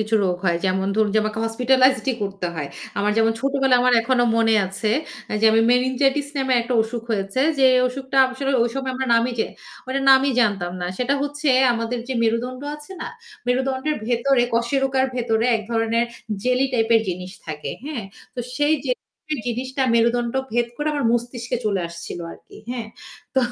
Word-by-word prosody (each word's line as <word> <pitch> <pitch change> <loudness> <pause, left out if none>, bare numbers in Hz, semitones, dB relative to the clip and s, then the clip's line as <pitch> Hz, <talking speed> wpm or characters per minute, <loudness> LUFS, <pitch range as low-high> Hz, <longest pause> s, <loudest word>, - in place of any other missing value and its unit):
কিছু 215 +1 -1
রোগ 180 -1 0
হয়। 170 -2 +2
যেমন 190 +1 +1
ধরু 215 -1 +2
যে - - +5
আমাকে 215 +1 -3
হসপিটালাইজড 255 +4 +3
ই - - -3
করতে 195 -2 -3
হয়। 145 -3 -4 0.3
আমার 205 +1 +1
যেমন 225 0 +3
ছোটবেলায় 270 -2 +2
আমার 250 0 +4
এখনো 245 +1 +2
মনে 225 -1 +3
আছে 195 +3 -2 0.5
যে 225 - +2
আমি 225 - +4
মেনিনজাইটিস 265 +3 +2
নামে 265 -1 0
একটা 245 +1 -2
অসুখ 225 +1 -5
হয়েছে। 195 +3 -1 0.2
যে 270 - +4 0.2
অসুখটা 265 +1 -6 0.2
আসলে 270 +1 -2
ঐ - - +3
সময় 265 -1 -2
আমরা 265 0 -2
নামই 230 +2 +2
যে - - +1 0.4
ওইটার 270 +1 -2
নামই 270 +1 +6
জানতাম 195 -6 0
না। 175 - -2
সেটা 250 +3 +1
হচ্ছে 290 +1 -2 0.2
আমাদের 230 +1 -2
যে - - -1
মেরুদন্ড 240 +3 -1
আছে 300 +5 -10
না, - - -4 0.4
মেরুদণ্ডের 265 +4 0
ভেতরে 240 +2 +2
কশেরোকার 265 +3 +1
ভেতরে 230 -2 0
এক 220 - -6
ধরনের 230 0 +1 0.4
জেলি 255 +1 +2
টাইপের 225 -1 +3
জিনিস 180 +1 -5
থাকে। 150 -1 -5 0.2
হ্যাঁ? 275 -9 -4 0.3
তো 250 - -3 0.2
সেই 295 +2 +3
জেলি 300 +4 -4
জিনিসটা 260 +3 -2
মেরুদণ্ড 235 +1 +2 0.2
ভেদ 240 0 +1
করে 295 +1 -1
আমার 285 -3 -1
মস্তিষ্কে 240 0 -2
চলে 200 -3 0
আসছিল 170 +1 -8
আরকি। - - -16
হ্যাঁ। 240 -3 -4 0.5
তো 265 - +4
245 Hz, 175 wpm, -22 LUFS, 225-265 Hz, 0.5 s, নামই